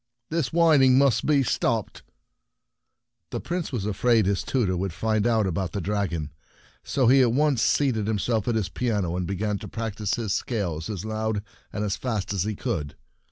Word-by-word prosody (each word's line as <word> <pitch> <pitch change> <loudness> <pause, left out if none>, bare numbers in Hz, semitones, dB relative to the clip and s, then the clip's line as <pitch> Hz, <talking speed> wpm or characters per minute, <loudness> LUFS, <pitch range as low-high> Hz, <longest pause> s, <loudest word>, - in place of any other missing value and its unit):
"This 160 -7 0
whining 150 -6 +5
must 140 -3 +3
be 145 -3 +4
stopped! 115 -2 -1 0.6
" - - -56
The - - -3
Prince 175 -2 -3
was 115 -7 -2
afraid 110 +1 +2
his 100 0 +1
tutor 110 -9 0
would 95 0 -2
find 110 +4 0
out 110 -3 +2
about 95 -1 -2
the 100 - -2
dragon, 100 -3 -1
and 75 - -6 0.5
so 135 - 0
he 130 +3 +6
at 120 -3 +3
once 145 -3 +2
seated 120 -6 +2
himself 110 +1 0
at 120 - +1
his 105 -4 0
piano, 105 -8 -1
and 90 -1 -2
began 100 +1 -2
to - - -8
practice 110 -3 -3
his 110 -5 -2
scales 90 -8 -2
as 100 -2 -4
loud 110 -1 -2 0.3
and 105 - -3
as 100 - -1
fast 110 -7 -2
as 95 -1 -1
he 105 0 -2
could. 90 - -3
110 Hz, 190 wpm, -25 LUFS, 100-125 Hz, 0.6 s, he